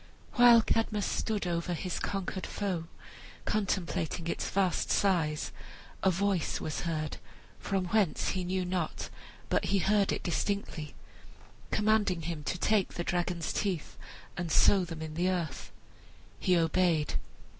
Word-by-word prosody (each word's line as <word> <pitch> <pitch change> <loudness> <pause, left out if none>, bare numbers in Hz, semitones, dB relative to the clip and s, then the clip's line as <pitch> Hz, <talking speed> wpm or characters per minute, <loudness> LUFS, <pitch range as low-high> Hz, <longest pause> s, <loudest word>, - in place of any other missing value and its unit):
While 240 -2 +8
Cadmus 215 -3 +1
stood 215 -3 -1
over 175 0 -1
his 180 +2 -3
conquered 190 -1 -3
foe, 185 -5 -2 0.6
contemplating 185 -5 -1
its 170 - -2
vast 190 -2 +1
size, 165 -6 +1 0.5
a 190 - +4
voice 190 -1 0
was 155 - -3
heard 155 -2 -2 0.4
(from 195 -2 -1
whence 210 -6 +2
he 185 -1 -1
knew 185 +1 -1
not, 180 -3 -2 0.4
but - - +1
he 200 - +2
heard 200 +2 +3
it - - -2
distinctly) 175 -4 -2 0.7
commanding 210 -5 +2
him 160 -2 -4
to 185 - -1
take 205 +1 +1
the 175 - -2
dragon's 175 -1 -1
teeth 185 -7 -2 0.4
and 175 -2 -3
sow 195 +3 +5
them 165 -2 -6
in 155 -1 -6
the 175 +3 +1
earth. 170 -7 -3 0.7
He 180 -1 +3
obeyed. 165 -2 +2
180 Hz, 135 wpm, -31 LUFS, 170-200 Hz, 0.7 s, While